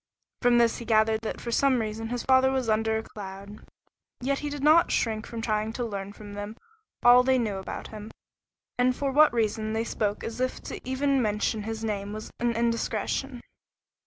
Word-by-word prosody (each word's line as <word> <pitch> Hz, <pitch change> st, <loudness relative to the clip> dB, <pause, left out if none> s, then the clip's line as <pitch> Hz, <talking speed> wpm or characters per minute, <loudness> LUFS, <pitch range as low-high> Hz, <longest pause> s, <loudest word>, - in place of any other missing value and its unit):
From 245 Hz, -1 st, +4 dB
this 235 Hz, -1 st, +3 dB
he 235 Hz, -, -7 dB
gathered 220 Hz, -1 st, +3 dB
that 225 Hz, -, -4 dB
for 235 Hz, -, -5 dB
some 265 Hz, +2 st, +3 dB
reason 220 Hz, 0 st, -4 dB
his 245 Hz, 0 st, -3 dB
father 260 Hz, 0 st, +4 dB
was 260 Hz, -3 st, -1 dB
under 220 Hz, 0 st, +2 dB
a 220 Hz, -, -3 dB
cloud. 200 Hz, 0 st, -9 dB, 0.6 s
Yet 275 Hz, +2 st, -1 dB
he 295 Hz, -, -3 dB
did 290 Hz, -1 st, -5 dB
not 315 Hz, +3 st, +6 dB
shrink 220 Hz, -2 st, 0 dB
from 230 Hz, -1 st, -6 dB
trying 215 Hz, -1 st, -1 dB
to 245 Hz, -, -3 dB
learn 200 Hz, -3 st, -5 dB
from 205 Hz, 0 st, -11 dB
them 205 Hz, +2 st, -6 dB, 0.5 s
all 245 Hz, +1 st, +8 dB
they 260 Hz, +1 st, +3 dB
knew 215 Hz, -5 st, -1 dB
about 190 Hz, -, -6 dB
him, 215 Hz, 0 st, -8 dB, 0.7 s
and 250 Hz, 0 st, +3 dB
for 275 Hz, 0 st, -1 dB
what 300 Hz, +3 st, +6 dB
reason 220 Hz, -1 st, -1 dB
they 225 Hz, +1 st, 0 dB
spoke 210 Hz, -3 st, -2 dB
as 230 Hz, +2 st, -5 dB
if 255 Hz, -, -1 dB
to -, -, -7 dB
even 275 Hz, 0 st, +1 dB
mention 210 Hz, 0 st, 0 dB
his 225 Hz, +1 st, -5 dB
name 205 Hz, -2 st, -3 dB
was 215 Hz, 0 st, -7 dB
an 235 Hz, -1 st, 0 dB
indiscretion. 235 Hz, +2 st, -1 dB
225 Hz, 195 wpm, -27 LUFS, 215-250 Hz, 0.7 s, all